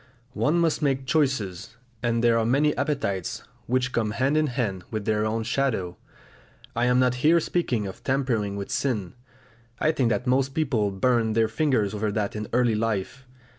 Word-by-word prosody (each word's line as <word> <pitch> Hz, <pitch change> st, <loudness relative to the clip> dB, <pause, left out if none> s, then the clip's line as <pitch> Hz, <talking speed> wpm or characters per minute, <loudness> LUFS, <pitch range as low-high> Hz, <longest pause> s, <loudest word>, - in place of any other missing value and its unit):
One 150 Hz, +5 st, +1 dB
must 165 Hz, -2 st, +1 dB
make 135 Hz, -2 st, 0 dB
choices; 120 Hz, -, -1 dB, 0.2 s
and 115 Hz, -1 st, 0 dB
there 115 Hz, -1 st, +4 dB
are -, -, +1 dB
many 140 Hz, +6 st, +2 dB
appetites 120 Hz, -6 st, -2 dB, 0.2 s
which 125 Hz, +1 st, 0 dB
come 110 Hz, -3 st, 0 dB
hand 135 Hz, +4 st, +2 dB
in 155 Hz, 0 st, +3 dB
hand 110 Hz, -8 st, -2 dB
with 110 Hz, -2 st, -4 dB
their 110 Hz, -1 st, +1 dB
own 110 Hz, +1 st, -1 dB
shadow. 110 Hz, -8 st, -1 dB, 0.8 s
I 120 Hz, +1 st, +1 dB
am 125 Hz, 0 st, +3 dB
not 125 Hz, -1 st, +3 dB
here 165 Hz, +4 st, +5 dB
speaking 130 Hz, -10 st, -1 dB
of 95 Hz, -, -8 dB
tampering 120 Hz, -7 st, 0 dB
with 100 Hz, -1 st, -5 dB
sin; 105 Hz, -10 st, -1 dB, 0.6 s
I 155 Hz, -, +2 dB
think 130 Hz, -7 st, +1 dB
that 125 Hz, +1 st, -1 dB
most 135 Hz, +1 st, +1 dB
people 125 Hz, -10 st, +1 dB
burn 110 Hz, +2 st, +1 dB
their 115 Hz, 0 st, +3 dB
fingers 110 Hz, -4 st, 0 dB
over 105 Hz, 0 st, -1 dB
that 105 Hz, -1 st, -2 dB
in 105 Hz, -1 st, -4 dB
early 120 Hz, -1 st, +2 dB
life. 115 Hz, +4 st, -2 dB
120 Hz, 175 wpm, -25 LUFS, 105-135 Hz, 0.8 s, here